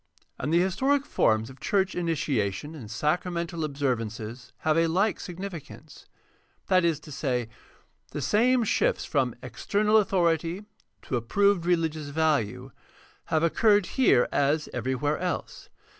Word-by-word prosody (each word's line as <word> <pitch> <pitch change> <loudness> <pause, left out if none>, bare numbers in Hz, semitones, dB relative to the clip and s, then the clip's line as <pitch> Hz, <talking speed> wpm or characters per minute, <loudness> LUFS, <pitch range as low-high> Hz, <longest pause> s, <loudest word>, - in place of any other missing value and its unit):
And 140 - -2
the 170 - +4
historic 265 +10 +1
forms 110 - +1
of 130 - -16
church 190 -2 +1
initiation 145 - -1
and 125 -9 -9
sacramental 170 - -1
observ 140 -5 0
ances 115 +2 -7
have 155 -1 +2
a 165 0 +3
like 190 +4 +1
significance. 170 -5 -9 0.6
That 185 -1 +4
is 165 -3 +1
to 150 - -12
say, 125 -5 -2 0.6
the - - -5
same 245 +3 +3
shifts 470 - +1
from - - 0
external 210 +1 +1
authority 175 -2 +1 0.4
to 125 - -2
approved 180 - +2
religious 160 -4 0
value 145 -8 0 0.5
have 160 0 0
occurred 205 +3 +3
here 235 - +4
as 145 +2 +1
everywhere 130 +5 -1
else. 180 -1 -4
160 Hz, 130 wpm, -27 LUFS, 140-185 Hz, 0.6 s, the